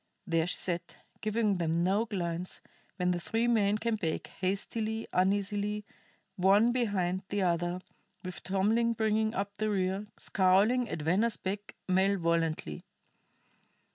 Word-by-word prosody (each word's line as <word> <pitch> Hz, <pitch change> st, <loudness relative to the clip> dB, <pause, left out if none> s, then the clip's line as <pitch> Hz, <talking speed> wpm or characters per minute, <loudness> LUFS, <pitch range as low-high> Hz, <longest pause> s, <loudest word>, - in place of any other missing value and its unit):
There 165 Hz, -3 st, +1 dB
she -, -, -1 dB
sat, 175 Hz, -2 st, -2 dB, 0.3 s
giving 215 Hz, -2 st, +1 dB
them 170 Hz, 0 st, +1 dB
no 200 Hz, +5 st, +2 dB
glance, 180 Hz, -4 st, -3 dB, 0.4 s
when 180 Hz, -2 st, +1 dB
the 175 Hz, -, 0 dB
three 225 Hz, +6 st, 0 dB
men 210 Hz, -3 st, +3 dB
came 225 Hz, 0 st, -1 dB
back, 165 Hz, -6 st, -3 dB
hastily, 215 Hz, +4 st, -1 dB
uneasily, 205 Hz, +2 st, +1 dB, 0.5 s
one 200 Hz, +5 st, +5 dB
behind 195 Hz, -7 st, 0 dB
the 205 Hz, -1 st, 0 dB
other, 175 Hz, +1 st, 0 dB, 0.4 s
with 180 Hz, -3 st, -6 dB
Tomlin 215 Hz, +5 st, +2 dB
bringing 220 Hz, 0 st, +1 dB
up 200 Hz, +1 st, -3 dB
the 215 Hz, 0 st, +1 dB
rear, 195 Hz, +1 st, -1 dB
scowling 205 Hz, +6 st, +3 dB
at 155 Hz, -, -4 dB
Venner's 200 Hz, +9 st, +2 dB
back 200 Hz, +2 st, -5 dB
malevolently. 170 Hz, -, +1 dB
195 Hz, 130 wpm, -31 LUFS, 180-215 Hz, 0.5 s, one